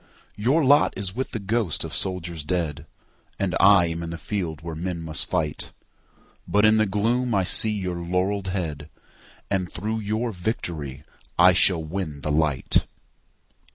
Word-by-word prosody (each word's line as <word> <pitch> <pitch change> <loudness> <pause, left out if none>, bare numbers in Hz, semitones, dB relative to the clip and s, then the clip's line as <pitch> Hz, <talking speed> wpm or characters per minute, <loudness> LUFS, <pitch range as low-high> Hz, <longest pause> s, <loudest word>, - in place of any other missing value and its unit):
Your 135 +9 +2
lot 145 +2 +4
is 95 -1 -2
with 130 +2 -3
the - - -4
ghosts 105 - -1
of - - -7
soldiers 85 -4 -2
dead, 80 -2 -3 0.5
And - - -1
I 95 -2 +6
am 85 0 -4
in 85 - -5
the 85 - -5
field 85 -5 -4
where 85 -1 -5
men 85 +2 -4
must 80 -1 +2
fight. 75 -2 -2 0.7
But 105 +1 +3
in 110 0 +5
the 110 -1 +2
gloom 115 +4 0
I 95 - +2
see 110 +4 +5
your 95 -4 -3
laurell'd 90 +3 -1
headAnd 90 +2 -6
through 110 +5 -3
your 110 +3 -2
victory 85 - -4 0.3
I 90 +1 +7
shall 90 -2 +5
win 80 -3 -5
the 75 - -2
light. 75 -3 +1
90 Hz, 155 wpm, -24 LUFS, 80-105 Hz, 0.7 s, I